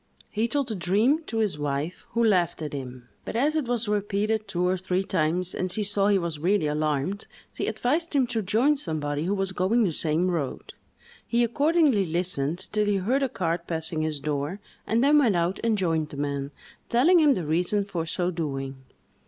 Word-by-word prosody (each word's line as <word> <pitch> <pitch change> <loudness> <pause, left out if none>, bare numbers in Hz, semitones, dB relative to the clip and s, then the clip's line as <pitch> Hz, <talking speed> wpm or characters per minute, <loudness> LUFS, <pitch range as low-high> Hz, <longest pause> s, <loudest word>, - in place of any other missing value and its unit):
He 220 +2 0
told 280 +2 0
the 225 - -2
dream 215 - +2
to 225 - -4
his 210 -9 0
wife, 145 +4 -3
who 235 - +2
laughed 175 -7 +2
at 150 - -5
him; 125 -3 -7 0.2
but, - - -6
as 290 +6 +2
it 305 -6 0
was 235 -2 -1
repeated 210 +1 -1
two 180 -2 0
or 185 - +2
three 185 +1 -1
times 180 0 0
and 185 0 -2
she 210 - 0
saw 205 0 +2
he 205 -1 +4
was 170 -4 -3
really 180 +1 +1
alarmed, 150 +5 -1 0.3
she - - -3
advised 310 +6 0
him 270 -2 +4
to 235 -2 -2
join 230 +10 +2
somebody 155 - -2
who 195 +3 0
was 195 -1 0
going 190 +6 +2
the 190 - +1
same 165 +3 +1
road. 150 -7 -4 0.5
He 240 0 +2
accordingly 280 - +2
listened 170 -2 -1
till 210 -1 +1
he 205 - +2
heard 240 +9 0
a 270 - +1
cart 170 -4 -2
passing 160 -1 -2
his 155 -2 -2
door, 145 +5 -3 0.3
and 230 +3 +2
then 295 +2 +5
went 235 -9 +3
out 175 +2 0
and 225 -2 +2
joined 165 -5 0
the 145 - -9
man, 140 -1 -2 0.4
telling 315 +10 +5
him 295 -4 +5
the 175 - -3
reason 180 +6 +1
for 175 -5 -4
so 180 +1 -1
doing. 135 -5 -4
185 Hz, 200 wpm, -26 LUFS, 160-225 Hz, 0.5 s, then